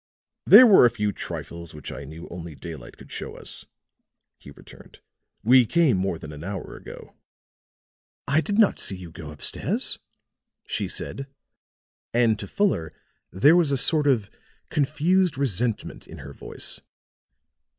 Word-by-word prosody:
"There 255 - +10
were 200 - +7
a - - +1
few 105 -3 -2
trifles 85 -3 -7
which 75 - -9
I 70 - -8
knew 80 +4 -10
only 85 -3 -8
daylight 75 -6 -10
would - - -15
show - - -6
us," - - -10 0.7
he - - -14
returned. 70 - -16 0.4
"We 125 +3 +6
came 165 -7 +3
more 95 -2 -1
than 75 -1 -10
an 75 +1 -10
hour 95 0 -6
ago." 475 +1 -12 1.1
"I 140 +3 +2
did 205 +4 -3
not 220 -3 +3
see 95 - -2
you 90 -3 -10
go 80 -2 -10
up 75 -2 -12
stairs," - - +4 0.7
she - - -3
said; 135 0 -4 0.9
and 115 -3 +2
to 100 - -6
Fuller 85 - -1 0.4
there 140 - +5
was 170 -5 +3
a 140 - +1
sort 150 +2 +2
of 115 -8 +1 0.4
confused 160 +4 +1
resentment 120 -4 -2
in - - -11
her 70 +1 -10
voice. - - -6
110 Hz, 150 wpm, -24 LUFS, -, 1.1 s, There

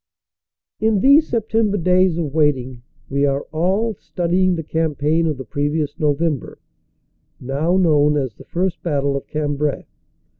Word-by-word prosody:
In 215 -3 +2
these 285 +5 +5
September 220 -2 0
days 180 -1 +2
of 155 -5 -3
waiting 130 -5 0 0.3
we 140 +1 -1
are 140 0 +1
all 190 +8 0
studying 180 0 0
the 165 - -4
campaign 160 +1 0
of 150 -3 -2
the 130 - -7
previous 145 - -2
November, 150 -1 -1 0.8
now 145 +8 0
known 150 -4 +3
as 130 -5 -2
the - - -15
First 180 0 -2
Battle 140 -4 -1
of 140 - -5
Cambrai. 145 -1 -2
155 Hz, 140 wpm, -20 LUFS, 145-185 Hz, 0.8 s, these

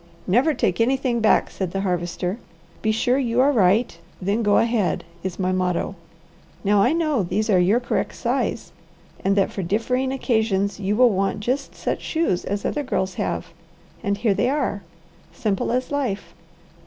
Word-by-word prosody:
"Never 255 - +3
take - - 0
anything 255 0 +1
back," 215 -1 +3
said 190 -2 -3
the 195 - -1
Harvester. 180 +2 -2 0.4
"'Be 220 - +1
sure 245 +4 +1
you 240 -2 0
are 275 +3 +5
right, 205 -4 +2 0.2
then 200 +4 0
go 205 -2 +3
ahead,' 230 -5 +1 0.2
is 185 -1 -4
my 185 -1 0
motto. 185 0 0 0.7
Now 205 0 +4
I 245 - +4
know 310 -7 +1
these 210 +5 -1
are 185 - +5
your 195 +7 +4
correct 245 - -2
size - - -2 0.5
and 195 +1 +2
that 195 -1 +2
for 195 - -4
differing 240 +8 0
occasions 220 -7 0
you 200 +1 0
will 245 +1 +5
want 195 +1 0
just 260 +5 -2
such - - -3
shoes 320 - 0
as 200 +1 -3
other 295 - -1
girls 190 -8 -1
have, - - -3 0.5
and 200 0 -1
here 210 -1 +2
they 245 +5 +1
are. 270 -8 -1 0.5
Simple 195 +4 -1
as 255 +3 -1
life! 250 -9 -2
215 Hz, 170 wpm, -23 LUFS, 195-250 Hz, 0.7 s, are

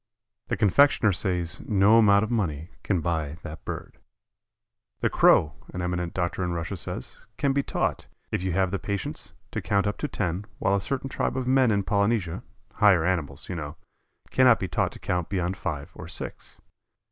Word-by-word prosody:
The - - -1
confectioner 110 +1 +4
says 90 -3 -1
no 105 +2 +5
amount 100 -2 +5
of 110 - -3
money 85 -7 -2
can 90 -5 0
buy 80 -3 -2
that 80 - -8
bird. - - -7 1.0
The - - +1
Crow, 75 -2 +5 0.2
an 90 - -2
eminent 90 -1 -2
doctor 90 0 -1
in 90 -1 -1
Russia 85 +3 -3
says, 80 -7 -6
can 140 -1 +1
be 140 - +2
taught, - - -2 0.2
if - - -1
you 95 0 -1
have 95 0 +1
the 100 - -1
patience, 100 -2 -4 0.2
to - - -3
count 100 -1 +1
up 105 0 -2
to - - -1
ten, 90 +4 -2
while 95 - +1
a 100 - 0
certain 135 +5 -2
tribe 135 - -2
of 130 - -1
men 130 -1 +4
in 100 -2 +2
Polynesia, 100 -3 0 0.3
"higher" 100 -6 +4
animals, 80 -7 -1
you - - -4
know, 75 -2 -5 0.6
cannot 130 -2 +5
be 95 - -2
taught - - 0
to - - -10
count 90 -2 -2
beyond 90 -1 -1
five 75 -2 -4
or 80 - -9
six. 80 - -6
95 Hz, 185 wpm, -26 LUFS, 85-105 Hz, 1.0 s, no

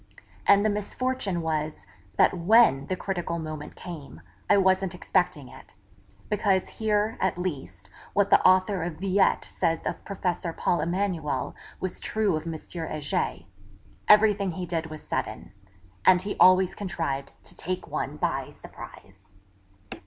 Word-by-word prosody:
And 200 +1 +6
the - - +4
misfortune 210 -3 -2
was, 155 -1 -2 0.3
that - - +5
when 175 - +4
the 185 - -1
critical 175 -3 -3
moment 155 -2 -6
came, 145 - -9 0.3
I 205 - +6
wasn't 190 -1 +2
expecting 175 -6 0
it; - - -15 0.5
because, 200 -3 0
here, 215 0 +1
at 190 -2 0
least, 135 - -5 0.3
what 200 0 +2
the - - +6
author 185 +1 +4
of 165 -1 -3
Villette 190 +3 +2
says 165 0 -1
of - - -3
Professor 180 -3 -3
Paul 175 - 0
Emanuel 170 -6 -1 0.3
was 185 -1 -4
true 215 -5 0
of 155 +2 -4
M. 165 - -3
Heger 155 -2 -3 0.6
everything 205 -3 +5
he 180 +1 -4
did 165 -2 -2
was 155 -1 -9
sudden; - - -4 0.5
and 180 - +6
he 205 - -3
always 185 0 +6
contrived 140 -8 -3
to - - -7
take 185 +1 -4
one - - -3
by - - -1
surprise. 95 0 -13
180 Hz, 140 wpm, -26 LUFS, 155-200 Hz, 0.6 s, And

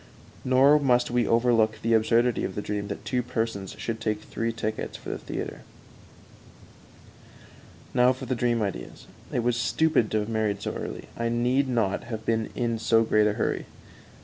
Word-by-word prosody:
Nor 135 +3 +5
must 125 -4 +2
we 120 -1 +2
overlook 115 -2 +3
the 115 0 +2
absurdity 115 +2 +3
of 95 - -3
the 105 - -2
dream 105 -1 -3
that 100 - -6
two 125 -1 0
persons 115 -5 -3
should 115 -1 -4
take 105 -1 -1
three 115 0 -2
tickets 110 -1 -4
for - - -9
the - - -4
theater. - - -5 2.3
Now 125 0 +5
for 130 - -5
the - - -1
dream 120 -2 +1
ideas. 90 -12 -5 0.3
It 120 - 0
was 120 0 +2
stupid 120 0 +2
to 110 - +1
have 105 - -4
married 110 -3 -1
so - - -2
early; - - -6
I 115 0 -1
need 125 +4 +1
not 115 -6 0
have 110 -2 -6
been 115 -1 0
in 115 -2 -1
so 115 0 +3
great 105 -1 +3
a 105 - +1
hurry. 110 - -2
115 Hz, 175 wpm, -26 LUFS, 110-120 Hz, 2.3 s, Nor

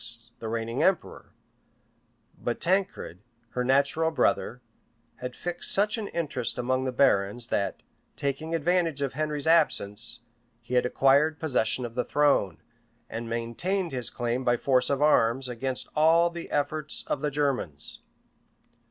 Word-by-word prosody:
the 110 - -5
reigning 115 +2 -2
emperor;[*] 190 -3 0 1.0
but 120 - -3
Tancred, 185 - -1 0.3
her 125 - -2
natural 140 +5 +2
brother, 125 -4 0 0.6
had 125 0 -6
fixed 175 0 -2
such 205 +3 +3
an 220 -3 -4
interest 145 - -2
among 130 +1 0
the 130 - -1
barons, 115 -3 +2
that, 100 -2 -2 0.3
taking 150 +4 -2
advantage 165 -2 +1
of 135 -3 -2
Henry's 150 0 -2
absence, 120 -9 +2 0.4
he 120 +1 -9
had 125 0 +3
acquired 140 +5 +3
possession 125 -5 +1
of 115 - -7
the 125 +1 -1
throne, 140 - +2 0.5
and 115 0 -5
maintained 165 +11 -2
his 125 -3 -2
claim, 120 +1 -2
by 120 -1 +2
force 130 0 +2
of 140 +1 +1
arms, 130 -3 +3
against 125 +1 -3
all 165 +3 +4
the 170 0 -7
efforts 150 +1 -2
of 140 - -2
the 150 - 0
Germans. 135 - -2
135 Hz, 140 wpm, -27 LUFS, 120-155 Hz, 1.0 s, all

